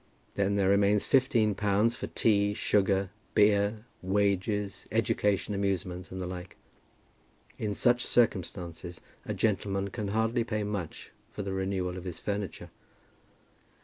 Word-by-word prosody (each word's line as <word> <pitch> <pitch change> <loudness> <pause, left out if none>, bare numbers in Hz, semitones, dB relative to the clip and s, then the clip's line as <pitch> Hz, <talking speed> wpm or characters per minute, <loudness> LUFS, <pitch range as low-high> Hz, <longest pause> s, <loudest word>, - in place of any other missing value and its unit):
Then 100 0 +1
there 100 -2 +2
remains 100 +1 +3
fifteen 120 -5 +3
pounds 105 +3 +2
for - - -5
tea, 105 -2 +2
sugar, 100 -2 +1 0.2
beer, 105 +1 +3 0.2
wages, 100 +1 0
education, 105 0 +1
amusements, 95 -2 -2
and 95 - -5
the 90 - -3
like. 90 0 -7 1.0
In 105 -2 -2
such 120 +2 +3
circumstances 90 -6 0 0.3
a - - -2
gentleman 100 -2 0
can 105 -1 -4
hardly 110 +3 +1
pay 105 -2 -2
much 100 -5 -5 0.2
for 105 - -6
the 95 0 -3
renewal 95 -1 -2
of 90 - -8
his 90 -3 -5
furniture! 100 -3 -4
100 Hz, 130 wpm, -29 LUFS, 95-105 Hz, 1.0 s, remains